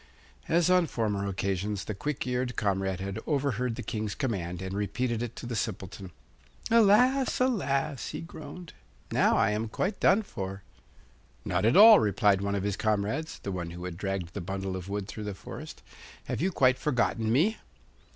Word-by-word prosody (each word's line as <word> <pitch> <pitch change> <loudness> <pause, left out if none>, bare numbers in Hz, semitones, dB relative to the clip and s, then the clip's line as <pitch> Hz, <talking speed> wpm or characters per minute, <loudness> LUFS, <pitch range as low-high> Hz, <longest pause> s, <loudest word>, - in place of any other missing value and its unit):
As 170 +1 +3
on 180 -2 +4
former 105 -6 -1
occasions, 100 +1 -2
the 105 - -3
quick 145 +9 -3
eared 125 -1 -1
comrade 95 -3 0
had 100 +2 -4
overheard 125 -5 0
the - - -6
King's 105 -1 -3
command 90 -10 -3
and 95 0 -5
repeated 110 +4 -1
it 120 -1 -4
to - - -8
the 120 0 -4
Simpleton. 95 -3 -4 0.6
'Alas, 240 +5 +4
alas!' 140 - 0
he - - -5
groaned; 175 0 -9 0.4
'now - - +3
I 110 -1 +3
am 110 +2 -1
quite 195 - -2
done 200 +4 +4
for.' 95 - -6 0.8
'Not 95 +3 0
at 115 - +4
all,' 215 +1 +10
replied 105 -2 +2
one 100 0 -1
of 100 - -2
his 100 -1 -1
comrades 110 +9 -1
(the 100 - -3
one 90 -2 -4
who 85 +1 -7
had 90 -2 -5
dragged 95 -2 -3
the 100 - -4
bundle 95 +1 -4
of 95 +1 -6
wood 100 -1 -3
through 105 +1 -6
the 105 -2 -4
forest). 100 - -9 0.4
'Have - - -4
you 190 +3 +1
quite 130 -6 +3
forgotten 115 -5 0
me? 170 - +3
110 Hz, 180 wpm, -28 LUFS, 95-140 Hz, 0.8 s, all